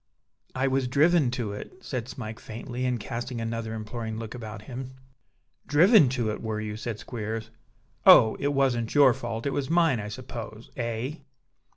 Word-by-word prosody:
"I 130 +1 +1
was 135 -1 +1
driven 150 +2 +4
to 115 -5 -2
it," 105 - -8
said 125 -9 -4
Smike, 110 -4 -7
faintly; 120 +3 -5
and 125 -2 0
casting 120 +3 -4
another 115 0 -3
imploring 110 0 -5
look 115 -1 -6
about 110 -3 -7
him. 130 +2 -7 0.7
"Driven 165 - +6
to 115 -3 0
it, - - -5
were 110 -1 -3
you?" 105 -1 -4
said 110 0 -4
Squeers. 110 -1 -5 0.5
"Oh! 110 - +8
it 140 - 0
wasn't 130 -4 +1
your 140 -4 +7
fault; 115 0 -5
it 140 - 0
was 140 0 -2
mine, 165 -7 +3
I 105 - -5
suppose 110 0 -8
eh?" 120 +5 -3
120 Hz, 170 wpm, -27 LUFS, 110-130 Hz, 0.7 s, Oh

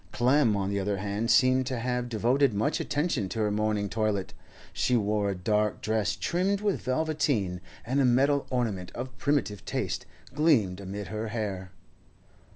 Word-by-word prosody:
Clem, 120 0 +3
on 100 0 -1
the 100 - 0
other 100 +1 -1
hand, 105 +3 -2
seemed 130 0 +4
to 130 -2 -2
have 125 +1 -2
devoted 120 +2 +2
much 105 +2 0
attention 145 - -1
to - - -5
her 105 -1 +1
morning 105 -1 0
toilet; 105 -2 -1 0.4
she 125 - +2
wore 105 -1 0
a 100 - -2
dark 105 +3 0
dress 110 -1 0
trimmed 190 +3 0
with 205 -2 -1
velveteen, 130 - 0 0.2
and 130 +4 +1
a - - +4
metal 135 +3 +3
ornament 110 -8 -2
of 130 +1 -6
primitive 125 -9 0
taste - - -3 0.3
gleamed 130 - +2
amid 100 +1 -6
her 110 +1 -3
hair. 100 -4 -4
110 Hz, 160 wpm, -28 LUFS, 100-130 Hz, 0.4 s, seemed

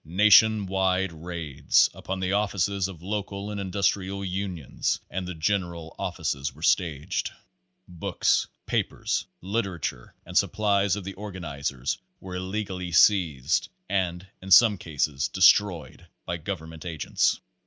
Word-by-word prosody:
Nation 105 +4 +5
wide 95 -1 +1
raids 80 -4 +1
upon 95 0 -5
the 95 +1 0
offices 100 -2 0
of 85 -4 -11
local 100 0 -4
and 100 -1 -4
indus 100 +1 -2
trial 100 0 -4
unions 90 -5 -2
and 95 -1 -3
the 90 - -5
general 85 -1 -2
offices 70 0 -2
were 80 - -12
staged. 80 -6 +1 0.6
Books, 85 -2 0 0.2
papers, - - -1
literature 95 - -3
and - - -10
supplies 100 -1 +2
of 105 - -6
the 95 +1 -6
organization 75 -10 -5 0.4
were 95 -1 -9
illegally 95 -1 -4
seized, 85 -7 +3 0.2
and 90 -2 -1 0.2
in 95 - -9
some 105 +3 +8
cases, 75 -1 -1
destroyed 95 -2 +3 0.2
by 85 - -3
govern 85 -1 -5
ment 80 -1 -10
agents. 80 -4 0
95 Hz, 130 wpm, -26 LUFS, 80-100 Hz, 0.6 s, some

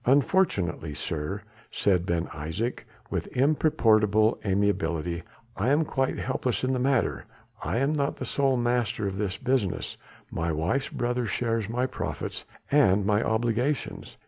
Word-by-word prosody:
"Unfortunately, 125 - +2
sir," 80 +7 -3 0.3
said 90 -3 +1
Ben 85 0 +1
Isaje 80 +11 -3 0.3
with 90 -4 -2
imperturbable 110 -7 +3
amiability, 90 -4 0 0.3
"I 110 +6 0
am 150 +3 +3
quite 135 -2 0
helpless 130 -1 -1
in 130 +1 +1
the 130 - 0
matter. 130 -1 +1 0.4
I - - -1
am 135 +4 +2
not 145 -1 0
the - - -5
sole 135 -2 +1
master 120 -3 0
of 95 0 -4
this 100 -2 -1
business, 125 -7 -1 0.3
my 80 +1 -1
wife's 85 - 0
brother 120 0 -1
shares 115 +1 -1
my 125 +2 0
profits 130 - -4 0.3
and 105 -9 +4
my 105 +1 +3
obligations. 120 +5 -1
115 Hz, 140 wpm, -27 LUFS, 95-130 Hz, 0.4 s, and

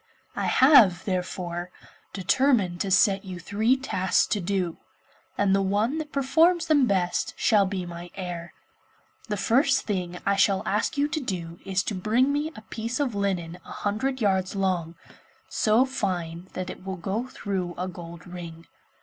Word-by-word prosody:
I - - -1
have, 255 - +6
therefore, 180 -2 -3 0.4
determined 195 -1 +2
to 200 - -1
set 195 +1 +4
you 185 -2 -7
three 215 +8 +1
tasks 190 -8 +1
to 210 - 0
do, 180 -2 -1 0.6
and 200 -1 +3
the 195 - +3
one 210 +10 0
that 305 -1 -6
performs 325 +6 +3
them 290 -5 +4
best 185 -4 0
shall 205 -4 +3
be 190 -2 -3
my 175 0 -8
heir. 175 -3 -6 0.8
The 210 - -1
first 265 +6 +3
thing 180 -4 -2
I 200 - +3
shall 195 -1 +3
ask 210 +7 0
you 285 +1 +2
to 310 +1 -1
do 175 - -5
is 190 -1 0
to 210 - -3
bring 230 +9 +2
me 295 +2 -1
a 215 - -9
piece 230 +3 -4
of 275 -5 0
linen 180 -4 -2
a - - -12
hundred 260 +6 -2
yards 190 -2 +1
long, 180 -4 -1 0.5
so 220 +4 +3
fine 180 -8 -3
that 185 0 -4
it - - -11
will 190 0 -5
go 200 +8 -3
through 185 -7 -4
a 180 +1 -2
gold 170 -1 -9
ring. 170 -2 -9
195 Hz, 165 wpm, -26 LUFS, 180-235 Hz, 0.8 s, have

